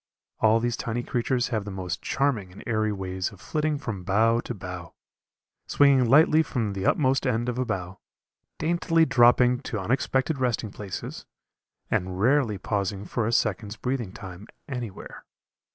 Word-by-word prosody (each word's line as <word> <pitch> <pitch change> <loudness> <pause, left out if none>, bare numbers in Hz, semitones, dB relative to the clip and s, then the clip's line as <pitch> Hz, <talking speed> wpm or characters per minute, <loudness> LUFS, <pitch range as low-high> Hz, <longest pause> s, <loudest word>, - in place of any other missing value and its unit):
All 110 +1 +4
these 120 0 -1
tiny 120 0 -3
creatures 125 +1 0
have 110 -4 -1
the 100 - -7
most 95 -2 -4
charming 125 -10 0
and 90 - -12
airy 110 -2 0
ways 95 -2 -3
of - - -15
flitting 155 -1 -1
from 110 -10 -5
bough 110 +5 +3
to 120 - -4
bough, 90 -3 -8 0.7
swinging 135 -4 +4
lightly 155 +3 +6
from 115 -9 -2
the 95 0 -2
utmost 135 -2 +2
end 120 -1 0
of 125 0 -2
a 130 - +1
bough, 95 -4 -4 0.6
daintily 165 0 +2
dropping 125 -1 +5
to 110 - -4
unexpected 130 - 0
resting 120 -4 -1
places, 100 -2 -7 0.6
and 90 0 -1
rarely 120 -2 +3
pausing 100 +1 -2
for 110 0 -1
a - - 0
second's 110 -2 0
breathing 125 -5 -2
time 95 +1 -10 0.2
anywhere. 120 -7 -7
115 Hz, 155 wpm, -26 LUFS, 100-130 Hz, 0.7 s, lightly